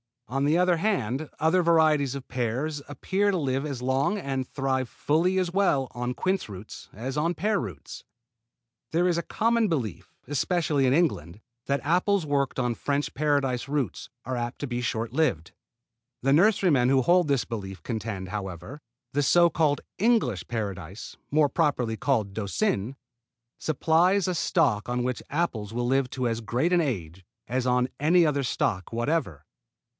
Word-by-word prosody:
On 135 +2 -1
the 155 +3 +3
other 180 -1 +3
hand 155 - -1
other 165 +4 +3
varieties 155 -5 +3
of 135 - -7
pears 130 +5 -2
appear 190 +9 0
to 190 - 0
live 135 -2 -1
as 140 -5 -4
long 135 +10 +1
and 135 -7 -3
thrive 130 -2 -1
fully 170 +5 +1
as 180 -2 0
well 160 -9 +2
on 125 +1 -3
quince 185 0 -1
roots 100 +1 -10
as 130 +7 -5
on 165 +3 +1
pear 210 0 +1
roots. 90 - -8 0.9
There 175 +2 +3
is 170 - +1
a - - +1
common 230 0 +1
belief, 130 - -3
especially 145 -1 +1
in 130 - +3
England, 110 - 0 0.2
that 140 -1 0
apples 180 +3 +2
worked 140 -2 0
on 125 -2 +1
French 145 +3 -2
paradise 140 -4 0
roots 140 - -2 0.2
are 130 +1 -2
apt 120 0 -4
to 145 - -3
be 120 -1 -3
short 115 -1 -2
lived. 85 - 0 0.7
The 135 - +3
nurserymen 170 - +4
who 135 0 +4
hold 175 +5 +4
this 140 -4 +2
belief 95 -4 -6
contend, 110 -5 -4
however, 100 - -6 0.3
that 145 - -1
the - - +3
so 170 +5 +5
called 150 -3 +1 0.2
English 160 - +2
Paradise, 100 -4 -5
more 150 -1 +3
properly 130 -9 0
called 110 -8 0
Doucin, 110 - -1 0.6
supplies 170 +6 +2
a - - 0
stock 150 -11 +1
on 125 0 0
which 125 0 -2
apples 115 -10 -2
will 120 +1 -1
live 135 +1 +1
to 130 -2 -1
as 115 -1 -1
great 125 +9 0
an 175 - +4
age 95 - -4 0.2
as 130 +1 -1
on 125 0 +2
any 170 +4 +4
other 140 -2 +1
stock 95 -6 -1
whatever. 120 - -1
135 Hz, 165 wpm, -26 LUFS, 120-165 Hz, 0.9 s, so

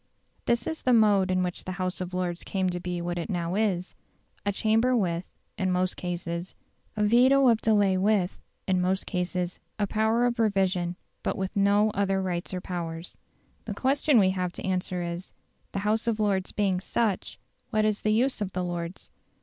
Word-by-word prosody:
This 235 0 +1
is 320 - -3
the 255 - +3
mode 205 -4 +4
in 185 0 +2
which 180 -1 -4
the 185 - -3
House 185 0 -2
of 180 0 -4
Lords 180 -1 -2
came 190 -2 -1
to 175 - -3
be 175 -1 -3
what 175 0 -2
it 170 - -4
now 175 -3 -1
is, 195 -3 0 0.5
a 200 - +1
chamber 225 +5 +2
with 175 -5 -1 0.3
(in 190 -1 +1
most 180 0 +1
cases) 175 0 -4 0.4
a 210 - +2
veto 255 +5 +5
of 230 -1 +3
delay 205 -4 +3
with 195 -2 +1 0.3
(in 185 -1 +2
most 190 +1 0
cases) 180 0 -2 0.2
a 205 - +1
power 220 +3 +2
of 240 -1 0
revision, 190 -5 +1 0.3
but - - -2
with 190 +2 -3
no 205 +2 +4
other 195 -1 +1
rights 180 -2 -2
or 185 - -2
powers. 170 -2 -5 0.5
The - - -4
question 275 +1 +3
we 190 -3 +5
have 180 -1 -2
to - - -7
answer 180 -1 -1
is, 170 +2 -5 0.4
"The 195 +1 -3
House 220 +2 +1
of 225 -2 +1
Lords 200 -3 +1
being 195 -3 +1
such, 205 0 -1 0.3
what 215 0 +2
is 215 -1 0
the 215 - 0
use 240 +2 +1
of 195 -2 -2
the 180 - -1
Lords?" 175 0 -5
190 Hz, 190 wpm, -27 LUFS, 180-215 Hz, 0.5 s, veto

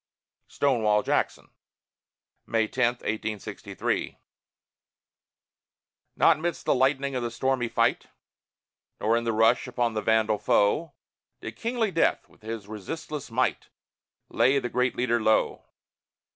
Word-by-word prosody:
STONEWALL 110 -7 +1
JACKSON - - -1 1.0
[May 110 -1 +1
10, 125 +2 +1 0.2
1863] 110 -1 -3 2.0
Not 160 -2 +4
midst 170 +1 -3
the - - +3
lightning 135 +1 +1
of 125 - -2
the 120 - -2
stormy 130 +1 0
fight, 115 - +1 0.9
Nor 110 +2 +2
in 115 0 -1
the 115 - +1
rush 115 +4 +3
upon 120 -2 -1
the 110 - -2
vandal 110 -1 +2
foe, 150 +11 +2 0.5
Did - - -7
kingly 230 -2 -1
Death, 165 - +1
with - - -25
his 110 -2 -6
resistless 140 - -6
might, 125 +2 -1 0.6
Lay 135 +2 +3
the 120 -3 -2
great 125 +1 0
leader 120 -1 +1
low. 110 0 +1
120 Hz, 120 wpm, -26 LUFS, 110-135 Hz, 2.0 s, Not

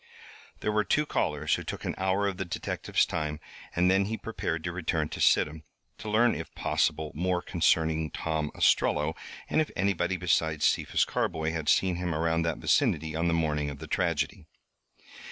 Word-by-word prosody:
There 105 - 0
were 105 0 +2
two 150 +7 +1
callers 75 - 0
who - - 0
took - - -6
an - - -1
hour 95 +2 +1
of 95 -2 -3
the 95 - -2
detective's 90 - -1
time, 75 0 -3 0.4
and 90 +1 +4
then 95 +1 +3
he 110 +2 -3
prepared 85 -8 -3
to 85 - -2
return 80 -3 -1
to - - -6
Sidham, 75 +1 +3 0.4
to 110 - -6
learn 115 +3 +4
if 80 - -6
possible 80 -1 0
more 90 +2 0
concerning 80 -3 +1
Tom 80 -2 -2
Ostrello, 75 +2 +2 0.3
and - - +2
if 155 - -2
anybody 95 -1 0
besides 80 -3 +1
Cephas - - +2
Carboy 80 0 -1
had 80 -2 -2
seen 90 0 +3
him 90 -2 -2
around 80 +1 +1
that 85 -1 -1
vicinity 80 0 +1
on 85 +2 0
the 85 - +2
morning 75 -3 0
of 70 - -7
the - - -8
tragedy. 85 0 -1
85 Hz, 180 wpm, -28 LUFS, 80-95 Hz, 0.4 s, and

